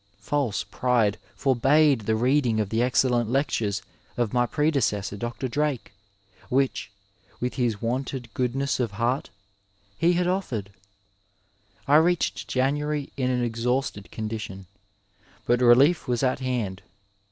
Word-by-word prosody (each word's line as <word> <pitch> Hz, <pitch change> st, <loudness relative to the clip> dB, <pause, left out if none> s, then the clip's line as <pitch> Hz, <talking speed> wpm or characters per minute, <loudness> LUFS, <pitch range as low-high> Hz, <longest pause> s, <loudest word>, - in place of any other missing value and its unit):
False 115 Hz, 0 st, -1 dB
pride 120 Hz, -5 st, +1 dB, 0.2 s
forbade 135 Hz, +1 st, +3 dB
the 110 Hz, -, +2 dB
reading 125 Hz, -1 st, +2 dB
of 105 Hz, -3 st, -1 dB
the 110 Hz, -, 0 dB
excdlent 125 Hz, -2 st, +2 dB
lectures 115 Hz, -7 st, 0 dB, 0.3 s
of 120 Hz, -2 st, 0 dB
my 120 Hz, -1 st, +2 dB
predecessor, 120 Hz, -11 st, 0 dB
Dr,' 120 Hz, +5 st, -4 dB
Drake, 130 Hz, -6 st, -2 dB, 0.6 s
which, 135 Hz, +1 st, 0 dB, 0.5 s
with 125 Hz, 0 st, -2 dB
his 120 Hz, -6 st, -1 dB
wonted 125 Hz, 0 st, -3 dB
goodness 135 Hz, +3 st, -1 dB
of 115 Hz, -5 st, -1 dB
heart, 120 Hz, +5 st, -1 dB, 0.7 s
he 175 Hz, +2 st, +4 dB
had 175 Hz, +1 st, +1 dB
offered. 130 Hz, -, -2 dB, 1.2 s
I 145 Hz, +2 st, +6 dB
reached 175 Hz, +2 st, +1 dB
January 145 Hz, +2 st, -1 dB
in 130 Hz, -2 st, 0 dB
an 125 Hz, -1 st, 0 dB
exhausted 120 Hz, -2 st, -2 dB
condition, 110 Hz, -3 st, -5 dB, 0.8 s
but 120 Hz, +1 st, +2 dB
relief 130 Hz, +7 st, +5 dB
was 125 Hz, +1 st, 0 dB
at 130 Hz, 0 st, +1 dB
hand. 120 Hz, -7 st, -2 dB
125 Hz, 125 wpm, -25 LUFS, 115-140 Hz, 1.2 s, I